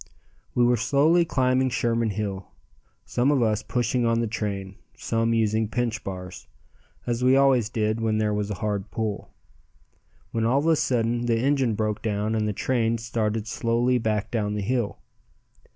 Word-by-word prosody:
We 125 - +4
were 120 0 +4
slowly 150 +9 +3
climbing 130 -3 +1
Sherman 115 -2 0
Hill, 100 -2 -4 0.6
some 125 +3 +1
of 140 -4 +3
us 110 -1 +1
pushing 125 +2 -1
on 115 0 +2
the 115 - +1
train, 100 -3 -4 0.2
some 115 0 -1
using 110 -1 +1
pinch 115 0 -2
bars 90 -1 -7 0.6
as 120 0 -1
we 130 +1 +5
always 135 -5 +4
did 110 -1 -1
where 110 -1 +1
there 105 -1 +1
was 105 0 -2
a 105 - -3
hard 100 -2 -2
pull 110 -3 -3 1.0
when 115 - -1
all 120 +4 +2
of 145 - 0
a 165 0 +4
sudden 120 -3 0
the 115 -1 +2
engine 130 -3 +1
broke 105 0 -2
down 105 0 -1
and 110 -1 0
the - - 0
train 115 +2 0
started 110 -1 -2
slowly 120 +2 +1
back 110 -2 -1
down 105 -3 -1
the 105 - -2
hill. 120 0 -1
115 Hz, 170 wpm, -25 LUFS, 105-125 Hz, 1.0 s, we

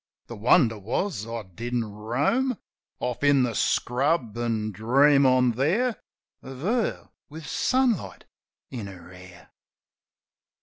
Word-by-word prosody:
The 120 - -9
wonder 115 0 +3
was 115 - -3
I 115 -1 -5
didn't 115 +5 -4
roam 135 - -1 0.4
Off 125 +2 -3
in 145 -2 +4
the 120 -2 -1
scrub, 125 -1 0
an' 115 -2 -2
dream 135 +7 +4
on 130 -1 +4
there 190 - +1 0.5
Of 130 0 -10
her 225 +7 -1 0.2
with 155 +1 -10
sunlight 255 -5 0 0.5
in 115 -6 -6
her 90 -2 -12
hair. 90 -1 -15
125 Hz, 120 wpm, -25 LUFS, 110-145 Hz, 0.5 s, in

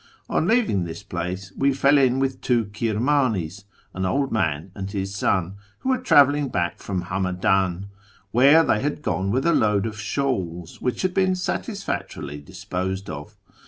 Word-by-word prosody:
On 160 - 0
leaving 215 - +2
this 85 -1 -7
place 95 +2 -5
we 140 0 +2
fell 140 +2 +4
in 130 -1 +3
with 135 -1 -1
two 120 -3 +2
Kirmanis 110 - 0
— - - -35
an 95 - -3
old 135 +9 0
man 80 -4 -1
and 95 -1 -5
his 100 -1 -3
son 95 -1 0
— 105 - -34
who 260 - -2
were 260 -1 +2
travelling 145 - +4
back 85 -6 -1
from 95 -3 -3
Hamadan, 95 0 0 0.5
where 140 +7 +6
they 110 - +2
had 145 +1 -2
gone 95 -6 -1
with 130 +6 0
a 170 - +4
load 105 -1 +2
of 110 -1 -5
shawls, 95 - -3
which 125 +6 -1
had 185 -1 0
been 190 -1 +2
satisfactorily 180 - -4
disj)osed 95 +4 -4
of. 75 +1 -8
105 Hz, 170 wpm, -23 LUFS, 95-140 Hz, 0.5 s, where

